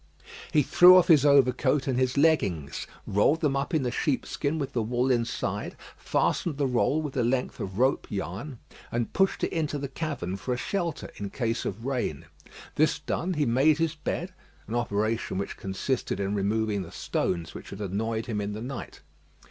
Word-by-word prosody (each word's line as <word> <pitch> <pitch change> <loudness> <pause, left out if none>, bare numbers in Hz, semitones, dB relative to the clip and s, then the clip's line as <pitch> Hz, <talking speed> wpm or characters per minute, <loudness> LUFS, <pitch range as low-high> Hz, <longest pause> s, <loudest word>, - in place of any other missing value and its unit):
He 150 -3 +4
threw 180 +6 +8
off 180 0 +4
his 150 -3 +6
overcoat 135 0 +4
and 130 -2 0
his 130 +1 +1
leggings; 100 - +1 0.2
rolled 105 +11 +2
them 145 -4 +1
up 140 +4 -1
in 155 -5 +1
the 125 - -1
sheepskin 145 +3 -1
with 140 -3 -3
the 120 - +1
wool 120 +4 +1
inside, 120 -2 -1 0.2
fastened 160 -5 0
the 145 - +1
roll 135 +4 +1
with 145 -3 -5
a 130 - +2
length 125 +2 -1
of 95 0 -5
rope 130 +3 +2
yarn, 100 - -5 0.3
and 120 -1 -2
pushed 195 0 +1
it - - 0
into 155 -3 -1
the 140 0 -3
cavern 130 - -4
for 125 +5 -2
a - - -5
shelter 170 +2 -3
in 100 -1 -4
case 115 -1 -2
of 110 +4 -4
rain. 125 - -2 0.5
This 155 0 +2
done, 170 +5 -2
he 150 -1 +1
made 135 +6 +4
his 165 -1 0
bed 170 +3 -4 0.3
an 110 - -6
operation 110 -3 -1
which 100 +1 -3
consisted 95 +7 -2
in 100 0 -1
removing 105 +1 0
the 85 - -8
stones 85 -3 -2
which - - -9
had 100 - -8
annoyed 110 +3 -2
him 110 -4 -2
in 100 0 -3
the 110 - -6
night. 130 +1 -7
125 Hz, 190 wpm, -27 LUFS, 105-150 Hz, 0.5 s, threw